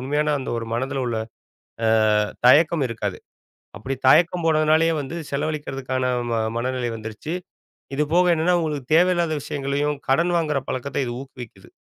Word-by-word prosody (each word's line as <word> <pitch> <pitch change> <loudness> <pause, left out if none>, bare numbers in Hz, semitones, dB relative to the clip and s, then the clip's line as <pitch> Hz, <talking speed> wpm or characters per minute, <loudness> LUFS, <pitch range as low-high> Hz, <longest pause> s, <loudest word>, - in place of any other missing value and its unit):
உண்மயான 150 +3 0
அந்த 130 - -5
ஒரு 115 - -6
மனதுல 130 +2 -2
உள்ள 115 -2 -1 0.7
அ - - +3 0.6
தயக்கம் 150 +3 +5
இருக்காது. 105 -5 -4 0.6
அப்படி 130 +7 -4
தயக்கம் 170 +5 +4
போனதுனாலேயே 155 +1 +3
வந்து 145 +4 -6
செலவழிக்கறதுக்கான 135 -3 -3 0.3
ம 115 -1 0 0.2
மனநிலை 125 0 -2
வந்துருச்சு. 110 +9 -6 0.6
இது 150 - +2
போக 180 +1 +5
என்னன்னா, 165 +3 +2
உங்களுக்குத் 150 -4 -3
தேவையில்லாத 175 -2 +3
விஷயங்களையும், 145 0 -2
கடன் 170 +5 +2
வாங்குற 150 -4 0
பழக்கத்த 135 +2 -3
இது 120 - -3
ஊக்குவிக்குது. 120 -7 -12
140 Hz, 135 wpm, -23 LUFS, 130-155 Hz, 0.7 s, தயக்கம்